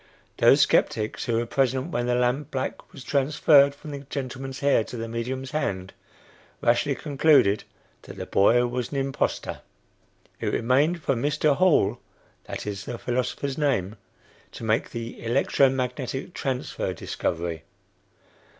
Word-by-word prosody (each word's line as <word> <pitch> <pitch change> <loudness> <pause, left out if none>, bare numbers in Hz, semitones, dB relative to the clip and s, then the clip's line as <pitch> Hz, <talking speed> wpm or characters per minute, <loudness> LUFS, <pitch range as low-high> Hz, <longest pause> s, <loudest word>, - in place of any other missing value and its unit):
Those - - +6
skeptics 105 0 +1
who 120 - -1
were 120 - 0
present 130 +5 0
when 120 -3 -1
the 120 - +2
lamp 125 +3 0
black 130 -1 -4
was 130 - -11
"transferred" 140 0 +4
from 150 +1 -10
the 140 - -5
gentleman's 135 -1 -6
hair 140 -5 +3
to 120 - -8
the 115 0 -4
medium's 125 +3 -4
hand, 95 -11 -2 0.7
rashly 130 +4 +2
concluded 140 -7 +3 0.4
that - - -11
the - - -5
boy 120 +5 +4
was 125 0 -3
an 140 - -3
impostor. 135 0 -2 0.8
It - - -3
remained 145 +8 +1
for - - +2
Mr. 145 +3 +1
Hall 135 - +3 0.5
that - - -6
is 100 -2 -5
the 120 - -5
philosopher's 130 +4 -2
name 110 -9 0 0.6
to - - -9
make 110 +1 +1
the 115 -1 -7
"electro 135 +3 +3
magnetic 130 +4 -3
transfer" 130 -2 -3
discovery. 85 -1 -3
130 Hz, 140 wpm, -25 LUFS, 115-140 Hz, 0.8 s, Those